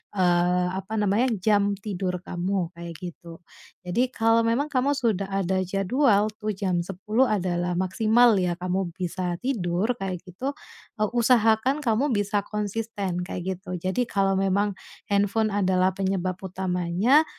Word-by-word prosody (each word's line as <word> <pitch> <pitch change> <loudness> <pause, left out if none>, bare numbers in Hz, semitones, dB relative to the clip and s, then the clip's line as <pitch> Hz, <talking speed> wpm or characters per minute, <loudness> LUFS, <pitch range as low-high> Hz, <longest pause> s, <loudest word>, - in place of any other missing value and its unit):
eee, 180 -1 +2
apa 195 +3 -5
namanya, 210 +4 +2 0.2
jam 205 -1 +3
tidur 190 -3 -4
kamu, 180 -1 -2
kayak 170 0 -9
gitu. 170 -1 -9 0.4
Jadi 190 +9 +1
kalo 225 0 +4
memang 280 +6 0
kamu 280 +1 +2
sudah 220 -8 0
ada 190 -1 0
jadwal 200 +4 +2
tuh, 215 -1 -2
jam 185 -2 0
10.00 205 +8 0
adalah 180 -4 -1
maksimal 220 +6 +4
ya 180 -1 0
kamu 180 0 -2
bisa 180 -1 -3
tidur, 205 -4 0
kayak 185 -3 -4
gitu, 250 +11 -5 0.5
eee, 215 - +1
usahakan 240 +3 +3
kamu 240 +2 +1
bisa 205 0 0
konsisten, 210 -3 -3
kayak 185 0 -4
gitu, 180 -1 -6
jadi 185 +8 -1
kalo 195 -2 +1
memang 195 +2 +1 0.4
handphone 205 +2 +2
adalah 185 -2 +2
penyebab 190 -1 -2
utamanya, 190 - +2
195 Hz, 140 wpm, -25 LUFS, 180-220 Hz, 0.5 s, kalo